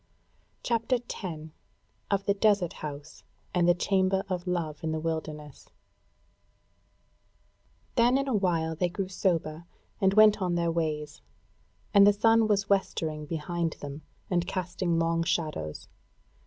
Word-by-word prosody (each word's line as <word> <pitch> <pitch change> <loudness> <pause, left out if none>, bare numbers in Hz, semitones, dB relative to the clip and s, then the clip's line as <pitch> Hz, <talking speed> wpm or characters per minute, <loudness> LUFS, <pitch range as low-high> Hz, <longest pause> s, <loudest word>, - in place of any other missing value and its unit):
CHAPTER 235 +2 +1
10 170 -9 -7 0.6
Of 200 -1 0
the 200 - +3
Desert 200 -4 +2
House 150 0 -8 0.3
and 175 -1 +3
the 175 - +5
Chamber 190 +1 +1
of 180 -1 -3
Love 165 -4 -2
in 160 - -1
the 160 - -1
Wilderness 155 -2 -5 2.2
Then 245 +2 +4
in 275 0 -1
a 265 - 0
while 170 -5 +1
they 175 +2 0
grew 190 +1 -4
sober 170 -3 -1 0.3
and 190 0 +3
went 215 -1 +6
on 180 -2 0
their 170 -1 +1
ways, 155 -2 -3 0.7
and 200 -1 +8
the 205 - +6
sun 225 +2 +4
was 200 -2 +1
westering 160 -6 -1
behind 165 +1 -2
them, 145 +1 -8 0.3
and 175 -2 0
casting 180 -2 -1
long 165 0 +1
shadows. 155 - -2
175 Hz, 135 wpm, -28 LUFS, 160-200 Hz, 2.2 s, and